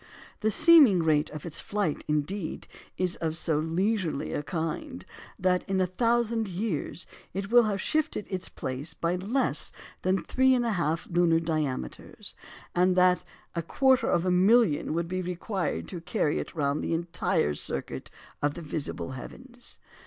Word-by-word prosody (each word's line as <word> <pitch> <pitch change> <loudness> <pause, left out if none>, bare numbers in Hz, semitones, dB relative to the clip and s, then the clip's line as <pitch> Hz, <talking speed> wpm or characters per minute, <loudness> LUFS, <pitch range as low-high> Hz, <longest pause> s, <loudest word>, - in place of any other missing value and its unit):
The 215 - +1
seeming 255 - +6
rate 155 -1 +2
of 155 +1 -8
its 165 -2 +1
flight, 200 -7 -2
indeed, 155 +4 -2 0.3
is 180 -1 0
of 160 -1 -2
so 160 -3 +1
leisurely 175 0 -1
a - - -1
kind, 170 - -4 0.3
that 180 -1 +2
in 190 -1 +1
a 185 - +3
thousand 230 +3 +1
years 180 -4 -3 0.3
it 195 +2 -3
will 240 -1 +7
have 205 -2 -1
shifted 310 -3 -1
its 185 -1 -3
place 130 +4 -4
by 170 +1 0
less 225 +9 +1 0.3
than 185 0 +1
3 260 0 +3
1/2 175 -10 0
lunar 170 -2 +4
diameters, 155 - -3 0.4
and 180 +1 +3
that 180 0 +4 0.3
a 170 - -1
quarter 260 - +3
of 175 +1 +2
a 185 - +2
million 185 -4 +4
would 170 0 -1
be 185 +1 -2
required 180 +2 -3
to 175 -3 -6
carry 150 -2 0
it - - -6
round 145 -1 0
the - - 0
entire 165 - 0
circuit - - -2 0.3
of 145 0 0
the 170 - -7
visible 150 -3 -3
heavens. 245 - -8
180 Hz, 155 wpm, -28 LUFS, 160-210 Hz, 0.4 s, will